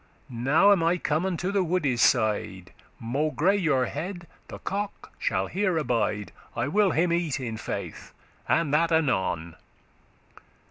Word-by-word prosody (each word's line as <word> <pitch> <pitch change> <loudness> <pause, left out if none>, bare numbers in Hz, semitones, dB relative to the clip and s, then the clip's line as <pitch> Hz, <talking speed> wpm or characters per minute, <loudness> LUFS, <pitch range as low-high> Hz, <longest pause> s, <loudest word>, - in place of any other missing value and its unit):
Now 135 +12 +4
am 195 -4 +4
I 165 +2 +2
come 160 +2 0
unto 185 +1 -2
the 200 -2 +2
woode's 155 -9 0
side, 105 -7 +1 0.3
Maugre 150 +9 +1
your 155 -10 +2
head, 175 +7 -5 0.2
the - - -8
cock 200 +1 -5
shall 95 +1 0
here 185 - 0
abide; 105 - -1 0.2
I 120 +3 -1
will 205 +3 +3
him 170 0 +1
eat, 170 -4 -1
in 120 -4 -4
faith, 110 - -6 0.4
and 165 -4 +2
that 165 +2 +3
anon. 95 - 0
155 Hz, 140 wpm, -26 LUFS, 120-180 Hz, 0.4 s, Now